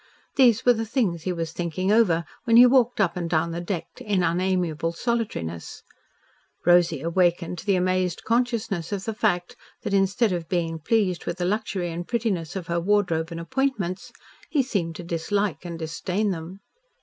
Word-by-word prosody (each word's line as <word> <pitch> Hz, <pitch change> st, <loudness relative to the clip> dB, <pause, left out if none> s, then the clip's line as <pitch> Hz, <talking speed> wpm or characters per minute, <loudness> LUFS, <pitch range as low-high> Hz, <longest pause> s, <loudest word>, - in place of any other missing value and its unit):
These 240 Hz, -5 st, +4 dB
were 245 Hz, -, +7 dB
the 225 Hz, -1 st, -2 dB
things 220 Hz, -, 0 dB
he 185 Hz, -, 0 dB
was 165 Hz, -2 st, -3 dB
thinking 175 Hz, +3 st, -2 dB
over 180 Hz, -7 st, +3 dB, 0.2 s
when 230 Hz, -1 st, +5 dB
he 245 Hz, -, +10 dB
walked 245 Hz, -2 st, +3 dB
up 190 Hz, -5 st, +2 dB
and 175 Hz, -2 st, -3 dB
down 165 Hz, 0 st, +1 dB
the 170 Hz, +1 st, -4 dB
deck 175 Hz, -2 st, -3 dB
in 200 Hz, -4 st, 0 dB
unamiable 170 Hz, -2 st, 0 dB
solitariness. 170 Hz, -, -3 dB, 0.8 s
Rosy 175 Hz, -4 st, +4 dB
awakened 175 Hz, 0 st, +1 dB
to -, -, -11 dB
the 200 Hz, -, +4 dB
amazed 185 Hz, -1 st, 0 dB
consciousness 230 Hz, -7 st, -1 dB
of 195 Hz, -2 st, -3 dB
the 225 Hz, -, -2 dB
fact 200 Hz, -5 st, 0 dB, 0.3 s
that, -, -, -3 dB
instead 200 Hz, +3 st, +2 dB
of 170 Hz, -3 st, -3 dB
being 165 Hz, -2 st, -1 dB
pleased 185 Hz, +1 st, 0 dB
with 170 Hz, -, -2 dB
the 180 Hz, -, -1 dB
luxury 195 Hz, -3 st, -1 dB
and 175 Hz, +1 st, -5 dB
prettiness 210 Hz, -9 st, -1 dB
of 185 Hz, -3 st, -4 dB
her 170 Hz, 0 st, -1 dB
wardrobe 175 Hz, -4 st, +1 dB
and 165 Hz, -1 st, -6 dB
appointments, 195 Hz, -1 st, -2 dB, 0.4 s
he 290 Hz, -4 st, +2 dB
seemed 185 Hz, -10 st, -2 dB
to 175 Hz, -, -7 dB
dislike 170 Hz, +1 st, -1 dB
and 170 Hz, -1 st, -5 dB
disdain 180 Hz, +5 st, -2 dB
them. 180 Hz, +3 st, -7 dB
180 Hz, 175 wpm, -25 LUFS, 170-210 Hz, 0.8 s, he